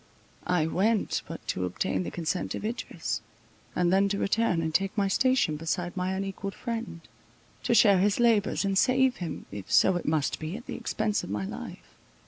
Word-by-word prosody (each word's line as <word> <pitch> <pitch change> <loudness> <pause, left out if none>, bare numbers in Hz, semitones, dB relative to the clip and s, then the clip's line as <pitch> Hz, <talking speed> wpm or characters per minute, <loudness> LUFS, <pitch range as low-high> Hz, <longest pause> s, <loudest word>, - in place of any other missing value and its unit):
I 180 -3 +2
went 205 +6 +1
but - - -8
to 90 - -1
obtain 95 +1 -1
the 85 - -3
consent 170 - -2
of - - -5
Idris, 165 - -3 0.5
and 175 0 +2
then 195 +1 +4
to 200 - -1
return 200 -3 +1
and 160 -1 -2
take 195 +4 0
my 200 -1 +2
station 250 -7 +2
beside 175 +3 -2
my 185 0 -1
unequalled 195 0 -4
friend; 230 -8 -5 0.6
to 235 - +1
share 200 -5 +6
his 205 +3 +2
labours, 225 -4 +3
and 195 0 0
save 260 0 +3
him, 175 -3 -5
if 100 -2 -8
so 190 -2 +5
it - - -6
must 155 -2 0
be, 160 +6 -4
at 240 - -11
the - - -6
expence 215 -1 -1
of - - -7
my 100 -1 -2
life. - - -8
190 Hz, 190 wpm, -28 LUFS, 160-215 Hz, 0.6 s, share